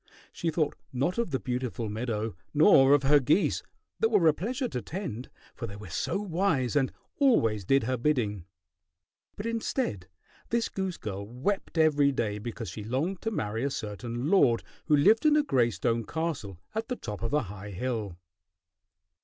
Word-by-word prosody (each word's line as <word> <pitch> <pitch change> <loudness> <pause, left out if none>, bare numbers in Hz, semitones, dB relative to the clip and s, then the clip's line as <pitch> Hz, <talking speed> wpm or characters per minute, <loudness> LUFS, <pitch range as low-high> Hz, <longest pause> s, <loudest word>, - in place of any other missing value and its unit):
She 170 - -1
thought 155 -2 0 0.2
not 140 - 0
of 235 - 0
the 135 -4 -1
beautiful 125 -2 -3
meadow 110 -1 -3 0.2
nor 145 -4 +7
of 145 - 0
her 145 +2 +6
geese 150 +9 +2 0.4
that 450 - +3
were 170 - +4
a 155 - +6
pleasure 245 - -2
to 125 - -4
tend, 145 - -5 0.2
for - - -6
they 100 - -8
were 105 -4 -10
so 175 - -1
wise 170 -9 0
and 135 -3 +2 0.3
always 115 - +3
did 135 +5 +3
her 130 +3 0
bidding; 115 - 0 0.9
but 205 - -6
instead 230 - -2 0.4
this 235 0 +1
goose 190 -2 -3
girl 100 -2 -5
wept 150 - -2
every 145 -3 +4
day 105 -5 -2
because 115 0 -6
she 105 - -7
longed 145 - -2
to 225 - -1
marry 110 - -2
a 140 - +1
certain 120 +2 -4
lord 135 -12 +4 0.2
who 150 - +4
lived 210 +10 +5
in 305 -1 +5
a 300 - +4
gray 125 - +2
stone 115 +3 -1
castle 155 - -3 0.2
at 220 +1 -2
the 250 - -2
top 105 - -6
of 115 - -2
a 150 -1 +2
high 105 0 -8
hill. 105 -3 -3
130 Hz, 180 wpm, -28 LUFS, 110-175 Hz, 0.9 s, nor